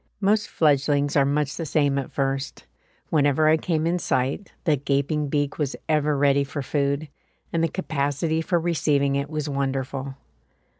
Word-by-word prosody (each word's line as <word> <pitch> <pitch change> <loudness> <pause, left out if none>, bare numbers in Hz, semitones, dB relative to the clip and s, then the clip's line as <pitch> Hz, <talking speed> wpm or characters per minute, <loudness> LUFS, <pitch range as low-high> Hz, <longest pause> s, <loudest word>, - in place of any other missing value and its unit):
Most 205 +1 +2
fledglings 145 -1 +2
are 140 -2 +5
much 145 0 -1
the 165 - -3
same 145 -2 +2
at 135 - -6
first; 135 -1 -2 0.5
whenever 150 0 +3
I 155 - +6
came 160 0 -1
in 175 +2 +1
sight 135 +6 -1
the 155 -4 +3
gaping 140 +2 0
beak 145 +1 -1
was 145 -2 -1
ever 150 -2 +2
ready 140 0 +3
for 140 +1 -5
food, 140 +2 -1 0.5
and 165 -1 +1
the - - +3
capacity 160 -2 -1
for 175 +1 +1
receiving 145 -4 +1
it 140 +1 -2
was 155 -2 -3
wonderful. 135 -1 -3
145 Hz, 160 wpm, -24 LUFS, 140-155 Hz, 0.5 s, I